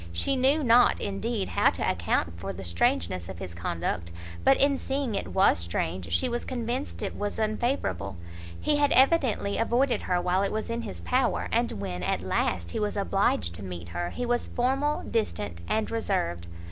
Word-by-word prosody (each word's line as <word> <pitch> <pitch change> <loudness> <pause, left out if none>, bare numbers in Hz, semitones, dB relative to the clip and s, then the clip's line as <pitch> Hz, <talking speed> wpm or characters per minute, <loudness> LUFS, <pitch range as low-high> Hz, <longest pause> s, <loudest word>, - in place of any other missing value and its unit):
She 85 - 0
knew 275 +4 +3
not, 245 0 +5
indeed, 205 +1 -2
how - - +4
to - - -2
account 85 -1 0
for 95 +2 -4
the 95 +1 -8
strangeness 85 0 0
of 95 - -7
his 90 -1 -7
conduct; 85 0 -3 0.3
but 135 - +5
in 280 0 +3
seeing 270 -3 -2
it 195 - -2
was 190 - +3
strange, 85 +1 -3
she 85 - +2
was 240 0 -2
convinced 245 0 -3
it 200 - -3
was 205 0 -3
unfavourable; 215 - -1 0.4
he 300 -1 +2
had 290 -1 +3
evidently 265 -7 +3
avoided 245 +3 +2
her 180 -1 0
while 180 +1 +1
it 200 - 0
was 220 +1 -3
in 235 0 -2
his 85 - -7
power, 85 -1 +1
and - - +1
when, 90 0 -4
at 90 -1 0
last, 90 -2 -1
he - - -2
was 210 0 -1
obliged 195 - +1
to 90 - -7
meet 85 -2 -7
her, 85 0 -3
he 245 - -4
was 240 0 0
formal, 270 +4 0
distant, 105 - -2
and 220 0 0
reserved. 85 - -1
195 Hz, 185 wpm, -27 LUFS, -, 0.4 s, not